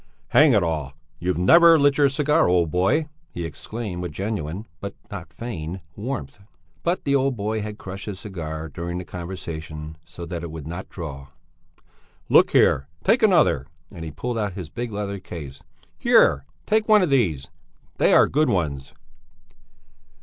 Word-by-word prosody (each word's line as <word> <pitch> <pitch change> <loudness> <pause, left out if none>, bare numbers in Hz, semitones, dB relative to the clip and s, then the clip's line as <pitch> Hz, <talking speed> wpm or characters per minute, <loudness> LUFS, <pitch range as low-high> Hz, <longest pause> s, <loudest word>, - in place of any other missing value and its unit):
"Hang 150 -2 +6
it 105 -4 +4
all, 75 -5 -2 0.3
you've 90 0 -1
never 165 - +7
lit 145 -1 +3
your 140 -1 +5
cigar, 150 +3 +2
old 85 -3 +2
boy!" 125 - +2 0.2
he 85 - -5
exclaimed 95 +3 -6
with 90 -2 -4
genuine, 95 +1 -4 0.5
not 90 -4 -7
feigned, 95 -7 -6 0.2
warmth. 105 - -5 0.4
But 175 +2 -1
the 140 - 0
old 135 -1 +2
boy 110 +1 -2
had 105 0 -6
crushed 95 +1 -8
his 100 -3 -5
cigar 80 -5 -6
during 85 +3 -5
the 90 - -5
conversation, 80 -3 -7
so 85 +2 -9
that 85 -1 -5
it 85 - -6
would 80 -2 -8
not 85 +4 -6
draw. 70 -6 -7 1.0
"Look - - +6
here! 70 - +3 0.2
Take 240 - +3
another!" 175 - +4 0.2
and 85 -4 -8
he 80 - -5
pulled 115 +10 -4
out 105 -3 -2
his 90 -5 -7
big 120 -1 -4
leather 100 -1 -4
case. 75 -7 -9 0.4
"Here! 70 - +4 0.2
Take 215 0 +1
one 210 -2 +7
of 170 - 0
these! 90 - +1 0.5
They - - +4
are - - +6
good 155 +2 +2
ones!" 70 -7 -2
95 Hz, 165 wpm, -23 LUFS, 80-120 Hz, 1.0 s, never